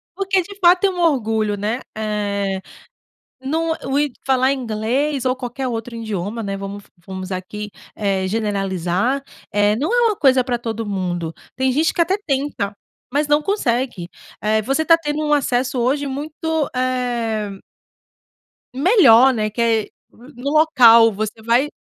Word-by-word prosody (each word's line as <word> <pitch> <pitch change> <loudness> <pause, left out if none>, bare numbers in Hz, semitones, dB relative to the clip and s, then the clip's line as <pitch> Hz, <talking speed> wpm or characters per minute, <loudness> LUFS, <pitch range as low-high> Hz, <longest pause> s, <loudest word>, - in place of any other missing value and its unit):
porque, 390 -1 +1
de 400 +3 -10
fato, 360 +2 +5
é - - +1
um 360 -1 -5
orgulho, 220 -10 +1
né. 220 +5 -2 0.2
Eh, 200 -3 -2 0.8
não 320 +4 -1
o 270 +1 0
idi 290 -3 -1
falar 260 0 +3
inglês 255 +4 -1
ou 255 0 +2
qualquer 255 +1 -5
outro 230 0 -5
idioma, 215 0 -4
né. 195 0 -3
Vamos 200 +1 -7 0.2
vamos 190 0 -7
aqui, 210 +3 -5 0.3
eh, 195 -2 -1
generalizar. 200 +3 -1 0.3
Eh, 205 0 +3
não 310 - -1
é 480 -1 +4
uma 425 - 0
coisa 260 -5 +4
pra 245 -1 -1
todo 225 -1 -4
mundo. 175 -4 -3 0.2
Tem 260 0 +1
gente 310 +5 +1
que 345 - +1
até 370 +4 +1
tenta, 270 -7 -1 0.4
mas 290 +2 +1
não 295 +1 +3
consegue. 245 - -1 0.3
Eh, 215 +1 +1
você 275 +8 0
tá 330 -1 +6
tendo 300 -1 -3
um 295 - +2
acesso 255 -2 0
hoje 280 +4 0
muito, 305 +2 -3
eh 240 -5 -1 1.2
Melhor, 265 - +6
né, 215 -2 -1
que 235 +3 -3
é 225 -2 +3 0.3
n 245 +5 -16
no 275 +4 -3
local 235 -8 +6
você 215 +2 -4
vai 240 +6 +2
245 Hz, 155 wpm, -20 LUFS, 210-290 Hz, 1.2 s, tá